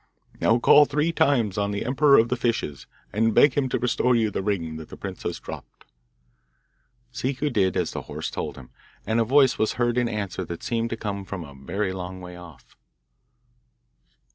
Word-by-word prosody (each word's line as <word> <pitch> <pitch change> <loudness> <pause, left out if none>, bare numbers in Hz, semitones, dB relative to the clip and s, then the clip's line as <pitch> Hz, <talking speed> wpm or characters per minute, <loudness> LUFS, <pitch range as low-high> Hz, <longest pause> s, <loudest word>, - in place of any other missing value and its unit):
'Now, 115 - +3
call 145 +4 +7
three 150 +4 0
times 120 - +2
on 100 0 0
the 100 +1 -3
emperor 140 +3 +5
of 115 +1 +4
the 125 - +1
fishes, 115 - -2 0.3
and 115 +1 +1
beg 145 - +6
him 135 -1 0
to - - 0
restore 125 0 +1
you 110 -2 +1
the - - -2
ring 85 -6 -2
that 80 - -10
the - - -10
princess - - -5
dropped. - - -10 1.3
Ciccu 135 +4 -2
did 95 -6 +1
as - - 0
the - - -5
horse - - -6
told - - -4
him, 65 -2 -13 0.3
and 110 +1 +1
a - - +4
voice 130 +2 +4
was 110 - +1
heard 120 0 +1
in 120 -1 0
answer 100 -4 -3
that 85 0 -7
seemed 115 -1 -1
to 115 - -4
come 100 -3 -4
from 95 -2 -6
a 70 -3 -11
very 95 +9 -3
long 95 0 -6
way 90 -1 -9
off. 85 -8 -14
110 Hz, 190 wpm, -25 LUFS, 95-125 Hz, 1.3 s, call